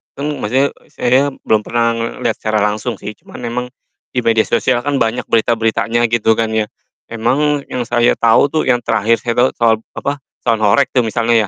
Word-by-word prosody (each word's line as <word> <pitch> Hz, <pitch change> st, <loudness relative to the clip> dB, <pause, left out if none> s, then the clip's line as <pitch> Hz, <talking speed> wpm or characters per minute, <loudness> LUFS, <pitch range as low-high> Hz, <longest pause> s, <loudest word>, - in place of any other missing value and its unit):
kan 140 Hz, +2 st, -3 dB
maksudnya 130 Hz, +6 st, +1 dB, 0.2 s
saya 135 Hz, +3 st, +2 dB, 0.2 s
belum 110 Hz, -1 st, +3 dB
pernah 115 Hz, -1 st, 0 dB
ngelihat 115 Hz, 0 st, -2 dB
secara 110 Hz, -1 st, 0 dB
langsung 105 Hz, +3 st, -1 dB
sih, 105 Hz, -, -7 dB
cuman -, -, -13 dB
emang 125 Hz, +1 st, -3 dB, 0.5 s
di 125 Hz, -, -1 dB
media 115 Hz, -1 st, +3 dB
sosial 125 Hz, -2 st, +1 dB
kan 145 Hz, 0 st, -1 dB
banyak 115 Hz, +1 st, 0 dB
berita-beritanya 115 Hz, +1 st, +1 dB
gitu 110 Hz, -1 st, +3 dB
kan 115 Hz, -1 st, -1 dB
ya. 110 Hz, -1 st, 0 dB, 0.4 s
Emang 140 Hz, +6 st, 0 dB
yang 125 Hz, -1 st, -2 dB
saya 120 Hz, 0 st, +3 dB
tahu 115 Hz, +4 st, +4 dB
tuh, 155 Hz, -, +1 dB
yang 120 Hz, -1 st, +2 dB
terakhir 110 Hz, +2 st, +1 dB
saya 120 Hz, -, -1 dB
tahu 125 Hz, +2 st, +4 dB
soal 115 Hz, -1 st, +3 dB, 0.2 s
apa, 140 Hz, +1 st, -2 dB, 0.3 s
sound 115 Hz, -2 st, +1 dB
horeg 115 Hz, +7 st, +4 dB
tuh 125 Hz, -2 st, +2 dB
misalnya 115 Hz, -1 st, +1 dB
115 Hz, 185 wpm, -16 LUFS, 110-125 Hz, 0.5 s, tahu